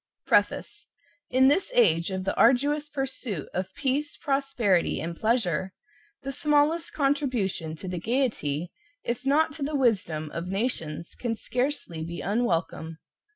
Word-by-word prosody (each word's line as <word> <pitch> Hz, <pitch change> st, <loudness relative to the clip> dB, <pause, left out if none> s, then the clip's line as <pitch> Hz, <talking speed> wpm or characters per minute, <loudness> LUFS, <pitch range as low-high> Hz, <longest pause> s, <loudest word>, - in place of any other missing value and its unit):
Preface. -, -, +1 dB, 0.4 s
In 260 Hz, +1 st, +5 dB
this 310 Hz, +7 st, +2 dB
age 170 Hz, -8 st, +4 dB
of 190 Hz, -1 st, -3 dB
the 195 Hz, -, -1 dB
arduous 290 Hz, +5 st, +3 dB
pursuit 265 Hz, -, -4 dB
of 185 Hz, +1 st, -2 dB
peace, 290 Hz, +1 st, -1 dB
prosperity 270 Hz, -, +1 dB
and 170 Hz, +1 st, -4 dB
pleasure, 190 Hz, -5 st, 0 dB, 0.5 s
the 275 Hz, -, -3 dB
smallest 300 Hz, +2 st, +2 dB
contribution 255 Hz, -, 0 dB
to 185 Hz, -, -9 dB
the 180 Hz, -1 st, -3 dB
gaiety, 180 Hz, -, -1 dB, 0.3 s
if 245 Hz, +3 st, -3 dB
not 310 Hz, +2 st, +3 dB
to 305 Hz, -, -10 dB
the 290 Hz, +2 st, -1 dB
wisdom, 185 Hz, -, +1 dB
of 170 Hz, +1 st, -4 dB
nations 180 Hz, -6 st, -2 dB
can 235 Hz, -2 st, -2 dB
scarcely 245 Hz, -, -2 dB
be 170 Hz, +1 st, -5 dB
unwelcome. 175 Hz, -6 st, -1 dB
235 Hz, 135 wpm, -27 LUFS, 175-275 Hz, 0.5 s, In